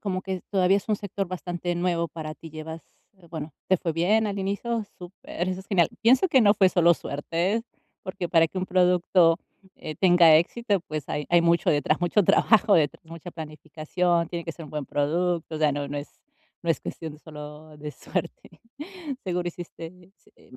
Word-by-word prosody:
como 185 -3 -3
que 190 -2 -4
todavía 195 0 +3
es 200 - -12
un 215 - +2
sector 200 -1 -4
bastante 175 -1 -3
nuevo 170 -1 0
para 155 -2 -7
ti, 165 - -11
llevas 160 +1 -7 0.3
eh, 185 -3 -21
bueno, 155 -2 -6 0.2
¿te 190 - +5
fue 165 -1 -2
bien 210 +7 +2
al 200 -1 -3
inicio? 205 +4 -2
Súper, 180 -1 -6
eso 185 0 -4
es 190 - -16
genial. 180 -5 +3
Pienso 255 +10 +4
que 265 -6 +5
no 205 -1 +5
fue 190 -2 +5
solo 170 -1 +5
suerte, 170 +10 -2 0.4
porque 185 -2 -4
para 165 -1 +5
que 190 - -13
un 185 - 0
producto, 180 -2 +4 0.4
eh, 155 - -7
tenga 175 -3 +6
éxito, 205 +3 -1
pues, 155 -2 -4
hay 150 -1 -2
hay 175 -1 +4
mucho 170 0 +2
detrás, 150 +1 +2
mucho 175 +4 +3
trabajo 220 +3 +4
detrás, 155 -1 +1
mucha 165 +2 -9
planificación, 165 +2 -2
tiene 170 -1 -5
que 165 - -4
ser 165 - -10
un 150 - -12
buen 150 -3 -4
producto. 165 +3 -1
O - - -3
sea, 155 -1 +3
no 145 0 -3
no 145 +1 -3
es 145 - -7 0.5
no 170 - 0
es - - +1
cuestión 160 -3 -6
de 150 - -14
solo 150 0 -11
de 150 0 -6
suerte. 170 +2 -6 0.6
Seguro 180 -2 -1
hiciste, 170 -1 -8 0.5
em 130 - -17
170 Hz, 195 wpm, -26 LUFS, 160-185 Hz, 0.6 s, tenga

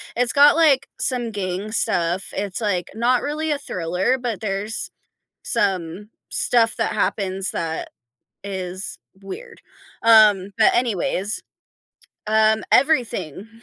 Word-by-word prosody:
It's 245 0 +1
got, 290 +3 +6
like, 285 -5 +3
some 245 -3 0
gang 195 +1 -4
stuff, 175 -3 +1
it's, 200 +1 -3
like, 185 -5 -1
not 240 +2 +2
really 305 +2 -3
a 290 - 0
thriller, 185 - -1
but 240 -5 -4
there's 210 +1 -2 0.5
some 195 -3 -1 0.2
stuff 230 -2 +2
that - - -1
happens 190 -1 -1
that 160 -1 -4 0.5
is 190 -1 -5 0.2
weird, 460 - -10 0.4
um, 215 -4 +5
but, 220 - +4
anyways 210 -3 -1 0.8
um, 220 0 +3
everything 235 - +1
215 Hz, 115 wpm, -21 LUFS, 190-245 Hz, 0.8 s, got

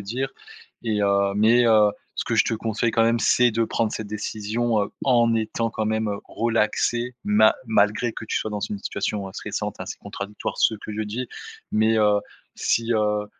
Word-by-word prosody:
dire 125 +7 -3 0.5
et 110 -3 0
heu, 100 0 +2
mais, 115 +3 +5
heu, 105 -2 +5 0.3
ce - - 0
que - - -1
je - - +4
te - - 0
conseille 115 +1 -1
quand 115 - +3
même 115 +1 +2
c'est 125 +1 +4
de 115 +1 0
prendre 110 -1 -1
cette 110 - -4
décision, 110 +2 -1
heu, - - -4
en 120 -3 +4
étant 115 +1 -1
quand 110 - -2
même 110 -1 0
relaxé 115 +2 0
ma 105 +1 +5
malgré 110 +2 +2
que - - -7
tu - - -2
sois 110 - -4
dans 105 - -3
une 105 - -3
situation, 100 0 -3
heu, - - -10
stressante - - -4
et - - -4
assez - - -6
contradictoire, 100 +1 -6
ce 110 - +3
que 105 0 -8
je 110 +1 -2
dis, 115 +4 -4 0.4
mais 110 +1 +3
heu, 105 -1 +4 0.4
si, 115 +1 +1
heu 105 -1 +1
110 Hz, 195 wpm, -24 LUFS, 105-115 Hz, 0.5 s, mais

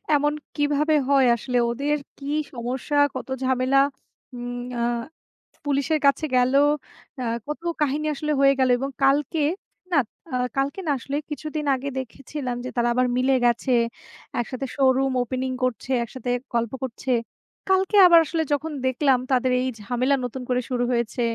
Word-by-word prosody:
এমন 295 +1 +2 0.2
কিভাবে 295 +1 +2
হয় 270 -2 +5
আসলে? 245 +2 -2
ওদের 285 +4 0 0.2
কি 275 - -10 0.3
সমস্যা? 255 +4 -3 0.2
কত 260 - -5 0.2
ঝামেলা? 260 +1 +3 0.5
উম 245 0 -5 0.2
আ - - 0 0.8
পুলিশের 285 +2 +1
কাছে 280 +3 +3
গেল, 250 +1 +3 0.7
আ - - -2 0.2
কত 300 +2 -4 0.2
কাহিনী 300 +2 +1
আসলে 300 +2 -2
হয়ে 275 0 +6
গেল 260 -1 +3
এবং 270 +2 -3
কালকে 290 +3 +2 0.5
না, 320 - +3 0.4
আ - - +1 0.2
কালকে 275 +7 0
না - - +3
আসলে, 275 +3 -5
কিছুদিন 300 0 -4
আগে 275 +2 -4
দেখেছিলাম 260 0 -5
যে - - -3
তারা 240 0 +2
আবার 250 0 +2
মিলে 265 +1 +3
গেছে। 240 +2 +1 0.7
একসাথে 255 +3 -3
শোরুম 270 -1 +3
ওপেনিং 255 +2 -3
করছে, 255 +1 -2
একসাথে 245 +1 -6 0.2
গল্প 235 -1 0
করছে। 255 +1 -4 0.6
কালকে 380 +2 +3
আবার 340 -1 +8
আসলে 320 +1 -1
যখন 310 +2 -2
দেখলাম 260 0 +3
তাদের 255 0 +2
এই 260 - -1
ঝামেলা 250 +5 +1
নতুন 250 +2 -5
করে 250 0 +2
শুরু 245 -1 0
হয়েছে। 235 0 -1
265 Hz, 150 wpm, -24 LUFS, 250-290 Hz, 0.8 s, আবার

